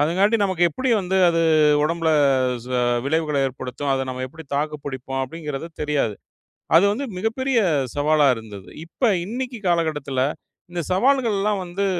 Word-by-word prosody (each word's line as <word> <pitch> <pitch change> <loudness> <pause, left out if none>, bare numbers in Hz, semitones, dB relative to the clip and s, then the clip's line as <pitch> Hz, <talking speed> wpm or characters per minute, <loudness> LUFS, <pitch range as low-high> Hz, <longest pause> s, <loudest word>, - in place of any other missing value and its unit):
அதுங்காண்டி 190 +9 +3
நமக்கு 185 -3 +1
எப்படி 255 - -3
வந்து 190 0 -1
அது 165 0 +1 0.4
ஒடம்புல 165 +1 0 0.5
ச 125 - -11 0.4
விளைவுகள 155 0 0
ஏற்படுத்தும்? 130 +2 -5
அத 135 0 0
நம்ம 130 0 -5
எப்படி 160 +4 -12
தாக்கு 150 +1 -1
பிடிப்போம்? 135 -1 -4
அப்டிங்கிறது 150 +1 -6
தெரியாது. 145 -8 0 0.6
அது 165 - +7
வந்து 270 +7 -3
மிகப்பெரிய 235 +5 0 0.4
சவாலா 150 +1 +3
இருந்தது. 105 -4 -10 0.2
இப்ப 245 +9 -2 0.2
இன்னைக்கு 245 +4 -4
காலகட்டத்துல 145 -6 0 0.5
இந்தச் 175 -2 -4
சவால்கள்லாம் 210 -4 +1
வந்து 190 +3 -2
165 Hz, 135 wpm, -22 LUFS, 145-200 Hz, 0.6 s, அது